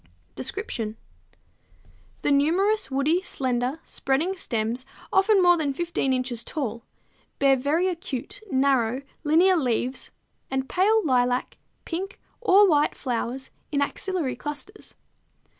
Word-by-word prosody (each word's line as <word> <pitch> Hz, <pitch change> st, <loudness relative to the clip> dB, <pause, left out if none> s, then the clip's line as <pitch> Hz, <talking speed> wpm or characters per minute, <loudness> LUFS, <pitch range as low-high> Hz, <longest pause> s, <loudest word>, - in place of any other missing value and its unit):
Description. 245 Hz, -, -4 dB, 1.3 s
The -, -, +2 dB
numerous 360 Hz, +10 st, +2 dB
woody, 285 Hz, +6 st, +2 dB
slender, 255 Hz, -3 st, -1 dB
spreading 305 Hz, +8 st, 0 dB
stems, 230 Hz, -5 st, -2 dB, 0.3 s
often 390 Hz, 0 st, +5 dB
more 350 Hz, -1 st, +6 dB
than 290 Hz, -4 st, 0 dB
15 335 Hz, -3 st, -1 dB
inches 255 Hz, -2 st, -1 dB
tall, 235 Hz, -7 st, -3 dB, 0.6 s
bear 275 Hz, -1 st, +5 dB
very 295 Hz, +8 st, +1 dB
acute, 335 Hz, -, -5 dB
narrow, 260 Hz, -2 st, +2 dB, 0.2 s
linear 340 Hz, +5 st, +5 dB
leaves 255 Hz, -2 st, -1 dB, 0.4 s
and 265 Hz, 0 st, -1 dB
pale 415 Hz, +5 st, +3 dB
lilac, 250 Hz, -2 st, +1 dB, 0.3 s
pink, 380 Hz, +4 st, -4 dB, 0.2 s
or 410 Hz, -3 st, +6 dB
white 295 Hz, -4 st, +2 dB
flowers 255 Hz, +1 st, -3 dB, 0.2 s
in 285 Hz, -, +1 dB
axillary 350 Hz, -3 st, -2 dB
clusters. 295 Hz, +8 st, -7 dB
280 Hz, 110 wpm, -25 LUFS, 255-360 Hz, 1.3 s, more